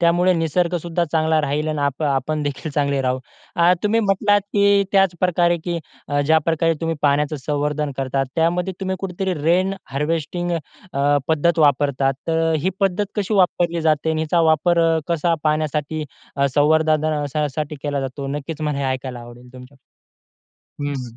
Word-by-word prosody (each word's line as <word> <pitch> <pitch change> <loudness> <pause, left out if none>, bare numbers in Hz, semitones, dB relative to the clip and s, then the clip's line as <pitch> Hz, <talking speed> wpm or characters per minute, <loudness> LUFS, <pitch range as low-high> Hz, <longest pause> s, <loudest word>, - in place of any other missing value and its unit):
त्यामुळे 175 +2 +3
निसर्गसुद्धा 170 +1 0
चांगला 160 -1 +2
राहील 150 +1 -1
आणि 155 -1 -2
आप 140 +1 -1
आपणदेखील 145 +1 -1
चांगले 140 -2 +1
राहू. 130 0 0 0.4
अ, 170 0 +5
तुम्ही 220 +2 +2
म्हटलात, 205 0 +2
की 200 -1 +4
त्याचप्रकारे 180 -2 +2
की 170 -1 -2 0.5
ज्याप्रकारे 160 +1 +2
तुम्ही 165 -1 -1
पाण्याचं 150 +1 +2
संवर्धन 150 0 -1
करतात, 135 0 -1
त्यामध्ये 175 +3 +1
तुम्ही 190 0 -2
कुठेतरी 190 0 -2
रेन 185 +5 +2 0.2
हार्वेस्टिंग 165 +4 -2 0.4
अ, 140 +1 +2
पद्धत 165 +2 +2
वापरतात, 140 -2 +2
तर 165 0 +1
ही 185 - +1
पद्धत 195 +1 +1
कशी 205 +1 -1
वापरली 175 -3 +2
जाते 155 0 +2
आणि 160 0 -1
हिचा 165 +2 +1
वापर 170 +2 +2 0.2
अ, - - +1
कसा 170 0 +1
पाण्यासाठी 155 0 -1 0.3
अ, 140 0 +3
संवर्ध 155 +2 +3
धना 155 -1 -1
अ, 150 +1 -1
...साठी 150 -1 -3
केला 145 -1 -1
जातो. 135 +1 -5
नक्कीच 145 +2 -5
मला 150 -2 -1
हे 140 - -2
ऐकायला 130 -2 -7
आवडेल 120 +1 -13
तुमच्याकडून? 130 +2 -13 1.0
हं, 145 0 -2
हं. 125 -4 -7
155 Hz, 155 wpm, -21 LUFS, 145-175 Hz, 1.0 s, अ